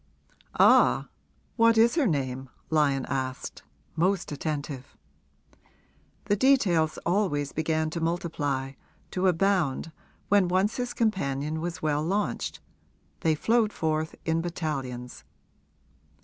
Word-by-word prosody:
'Ah, - - +5 0.5
what 230 -1 +5
is 230 +1 +5
her 310 -7 +2
name?' 135 -5 -2 0.2
Lyon 140 -4 +2
asked, 130 -1 -4 0.3
most 185 +2 +1
attentive. 145 -3 -5 1.3
The 205 - +2
details 195 - +3
always 170 -6 0
began 160 0 -1
to 170 - -4
multiply, 150 -5 -2 0.4
to 185 +1 +1
abound, 175 -4 +1 0.4
when 200 -2 +4
once 185 +4 +1
his 245 -1 -3
companion 155 - -1
was 175 -1 -5
well 150 -1 +1
launched 200 +5 -2 0.6
they 160 -1 +2
flowed 225 +5 +2
forth 155 -2 -2
in 165 0 +1
battalions. 135 -8 -4
160 Hz, 105 wpm, -27 LUFS, 145-195 Hz, 1.3 s, Ah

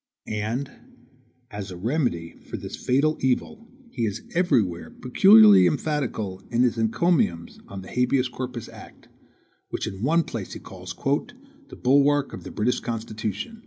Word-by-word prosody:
And 115 +6 -3 0.8
as 100 -1 -6
a 90 - -8
remedy 100 - -1 0.2
for - - -4
this - - -7
fatal 145 +5 +1
evil 130 - -1 0.2
he 115 -3 -1
is 105 +2 -5
everywhere 120 - +1
peculiarly 105 -3 +6
emphatical 110 - -2
in 120 +1 +2
his 120 -2 +2
encomiums 115 - 0
on 95 -1 -8
the - - -11
habeas 125 +1 +2
corpus 125 -1 -6
act, - - -14 0.6
which - - -3
in 95 0 -6
one 165 +7 +3
place 110 -10 -6
he - - -7
calls 90 -1 -9
"the 265 - -4
BULWARK 140 +2 +3
of - - -8
the - - -8
British 115 +4 0
Constitution." 110 - -5
120 Hz, 145 wpm, -25 LUFS, 105-140 Hz, 0.8 s, peculiarly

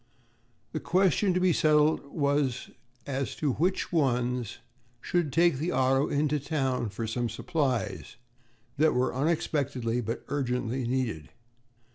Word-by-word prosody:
The 155 - -3
question 190 +3 +2
to - - +3
be 180 -1 +3
settled 155 0 +3
was 140 -3 -1 0.3
as 135 -1 -3
to 150 -3 0
what 180 +5 -1
ones 125 - 0 0.4
should 170 +2 -1
take 170 0 +3
the 165 +4 -1
auto 135 -1 +2
into 150 +1 +1
town 135 -5 -1
for 110 +3 -4
some 120 +2 -2
supplies 115 - -2 0.6
that 155 0 +3
were 125 +1 +1
unexpectedly 130 -5 -1
but 115 0 -4
urgently 125 -2 -2
needed. 120 - -2
135 Hz, 125 wpm, -28 LUFS, 125-155 Hz, 0.6 s, to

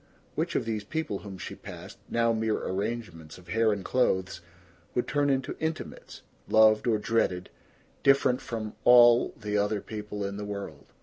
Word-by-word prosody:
Which - - -2
of - - 0
these 110 -2 -2
people 105 -4 -3
whom 100 -2 -9
she - - -7
passed, - - -10
now 115 0 +2
mere 110 -1 0
arrangements 95 -6 -4
of 90 -2 -16
hair 115 +3 +3
and 100 -2 -3
clothes, 95 -8 0 0.5
would 125 - 0
turn 145 -1 +1
into 135 0 0
intimates, 160 0 -5 0.3
loved 110 +1 +5
or 110 -2 +3
dreaded, 105 -4 0 0.5
different 135 -2 +3
from 110 -2 -5
all 120 -1 +7
the 105 0 -1
other 105 +1 0
people 105 -1 -6
in 100 0 -4
the 105 - -5
world? 100 -1 -7
110 Hz, 165 wpm, -28 LUFS, 100-120 Hz, 0.5 s, all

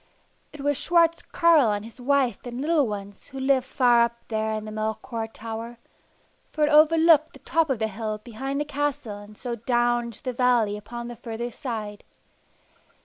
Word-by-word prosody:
It 300 - -10
was 290 -1 +1
Schwartz 335 -1 +3
Carl 320 -9 +4
and 205 0 -3
his 230 +2 -12
wife 270 -1 +2
and 245 0 -6
little 300 -1 +2
ones 200 -1 -7
who 270 - -8
lived 265 -1 +2
far 245 -3 +4
up 235 0 +1
there 220 -1 -1
in 215 0 -5
the 215 - -7
Melchior 220 +2 -3
Tower, 225 +1 -7 0.7
for 305 - -1
it 300 - 0
overlooked 315 0 +5
the - - -14
top 325 -2 +2
of 265 - +1
the 220 0 0
hill 215 +1 -4
behind 255 +5 -5
the 295 - -1
castle 285 -7 -3
and 205 0 -13
so 245 -2 -4
down 240 +1 +1
into 235 -3 -9
the 255 - -3
valley 240 -4 +2
upon 235 +3 -7
the 240 - -7
further 235 +1 -5
side. 215 -4 -6
240 Hz, 185 wpm, -25 LUFS, 220-280 Hz, 0.7 s, overlooked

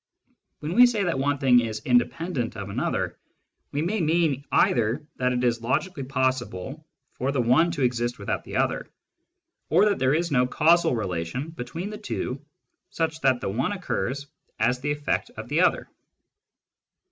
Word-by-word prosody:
When 155 +3 -3
we 245 +5 +8
say 220 -4 0
that 170 -7 0
one 145 +1 +1
thing 130 -3 +5
is 110 -2 -3
"independent" 125 0 0
of 100 -1 -6
another, - - -2 0.5
we 145 +2 -1
may 200 +4 0
mean 160 -4 +1
either 120 +5 +2
that 125 0 +1
it 125 0 -1
is 120 -2 +1
logically 145 +7 -1
possible 130 - -2 0.3
for 130 +2 -2
the 140 - -1
one 125 +8 +4
to 145 -5 -2
exist 120 -1 0
without 100 - -3
the - - -8
other, - - 0 0.8
or 180 +7 +5
that 205 -2 +1
there 130 +2 +3
is 170 0 -1
no 125 -2 +3
causal 165 0 +3
relation 95 - -3
between 165 +7 -6
the 210 - -7
two 140 - -4 0.5
such 160 -1 -2
that 130 -2 +3
the 130 - -2
one 115 +7 -1
only 205 - -3
occurs 140 -6 -3 0.3
as 125 +3 +2
the 145 +2 -1
eflFect 145 0 -1
of - - -7
the - - +2
other. - - +2
135 Hz, 170 wpm, -25 LUFS, 125-160 Hz, 0.8 s, we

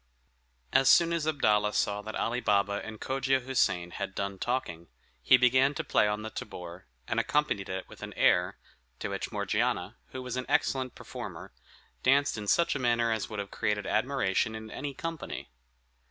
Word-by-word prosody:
As 135 0 +5
soon 170 -1 +6
as 160 -2 -1
Abdalla 105 -9 +2
saw 105 0 0
that 110 +1 -7
Ali 120 +2 0
Baba 100 -2 +1
and 110 -1 -8
Cogia 135 0 +1
Houssain 105 -9 0
had 100 +1 -5
done 100 -1 -3
talking, 85 -10 -2 0.3
he 130 - +6
began 130 +3 +4
to - - -2
play - - +3
on 105 +1 -2
the 110 - -5
tabor, 85 -9 -8 0.2
and - - 0
accompanied 150 -10 0
it 95 0 -4
with - - -14
an - - -6
air, 90 0 +3 0.4
to - - -4
which - - -4
Morgiana, - - -1
who 130 - -7
was 125 0 -4
an 130 - -3
excellent 135 -3 +1
performer, - - -8 0.5
danced 140 +2 +3
in 105 -2 -6
such 170 +10 +3
a - - -3
manner 120 -2 +2
as 110 -2 -2
would 105 - -6
have 100 -1 -4
created 105 -1 -1
admiration 110 -3 +1
in 110 0 -8
any 140 -1 -5
company. 165 - -6
115 Hz, 180 wpm, -29 LUFS, 100-135 Hz, 0.5 s, soon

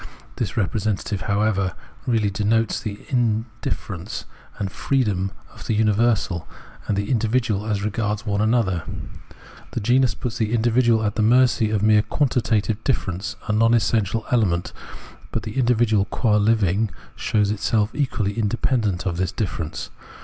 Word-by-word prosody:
This - - -3
representative, 105 -1 -1
however, 100 -2 +1 0.3
really 110 -4 +2
denotes 110 +2 +1
the 105 -2 -5
in 115 -4 +1 0.2
difference 100 +3 -4 0.3
and 100 -2 -3
freedom 105 -9 0 0.2
of - - -11
the 110 - +1
universal 105 -5 +1 0.4
and 100 - 0
the 100 +3 -1
indi 115 -3 +2
vidual 110 -3 0
as 100 -1 0
regards 105 +1 -2
one 100 -1 0
another; 110 -6 +2 0.9
the - - -1
genus 125 +4 +3
puts 125 -1 -4
the 110 0 0
individual 115 0 +3
at 105 +1 -1
the - - +2
mercy 120 -1 +4
of 105 -2 0
mere 105 -1 +5
quantitative 110 -3 0
difference, 95 -7 -2
a - - 0
non 115 +2 +4
essential 110 -1 +1
element, 95 -8 +1 0.6
but - - -2
the 135 - -4
individual 115 -5 +3
qua 105 0 +1
Hvitig 105 -1 +2 0.3
shows 105 -1 +1
itself 105 0 +1
equally 125 -8 -1
independent 110 -3 0
of 85 -3 -1
this 90 0 0
difference. 85 -6 -4
110 Hz, 145 wpm, -23 LUFS, 100-115 Hz, 0.9 s, mere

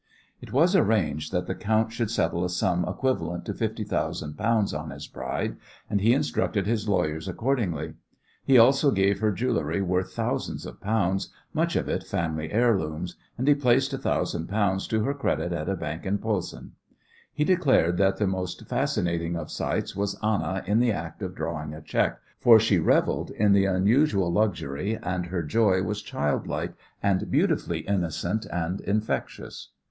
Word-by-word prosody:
It - - -10
was 165 +9 +4
arranged 80 - +1
that 90 -1 -1
the - - -2
count 110 +1 0
should 115 -2 -2
settle 85 -5 0
a 90 - -1
sum 90 0 +1
equivalent 130 -10 -1
to - - -3
fifty - - -2
thousand 75 0 -2
pounds 110 -3 +1
on 75 +1 -4
his 70 0 -7
bride, 65 0 -4 0.3
and 100 - +1
he 110 +4 +5
instructed 120 -7 0
his 110 -1 -1
lawyers 80 -3 0
accordingly. 105 - -1 0.5
He 135 - +5
also 135 +5 +6
gave 100 -4 +2
her 110 -1 +2
jewellery 100 -6 -1
worth 90 0 0
thousands - - -2
of - - -10
pounds, 100 -3 0 0.2
much - - 0
of - - 0
it - - -1
family 80 -1 -3
heirlooms, 90 -7 +1 0.2
and 130 +3 -2
he 145 - +8
placed 130 -1 +2
a - - -1
thousand 80 - -1
pounds 100 -2 0
to 110 -1 0
her 140 - 0
credit 125 -10 -1
at 85 +1 -3
a 95 - 0
bank 80 -2 -5
in 100 +2 0
Posen. 105 -5 -3 0.6
He 150 - 0
declared 140 - +3
that 95 0 +3
the 105 - +1
most 95 -1 -3
fascinating 85 0 -1
of 80 -2 -5
sights - - -2
was 100 0 -2
Anna 95 -4 0
in 105 +4 +2
the 120 -1 +3
act 85 -4 -5
of 95 -1 -4
drawing 75 -2 -4
a 80 - -9
cheque, - - 0 0.2
for 115 -2 +8
she 105 -4 +3
revelled 80 - +2
in 105 -1 +2
the 100 0 +5
unusual 100 - +3
luxury, 100 -1 0
and 90 0 -2
her 90 -1 -2
joy 95 +3 +2
was 105 +2 -2
childlike 75 0 -2 0.3
and 100 -2 +1
beautifully - - +1
innocent 95 +2 -1
and 90 +2 -2
infectious. 105 +2 -3
95 Hz, 175 wpm, -26 LUFS, 85-110 Hz, 0.6 s, he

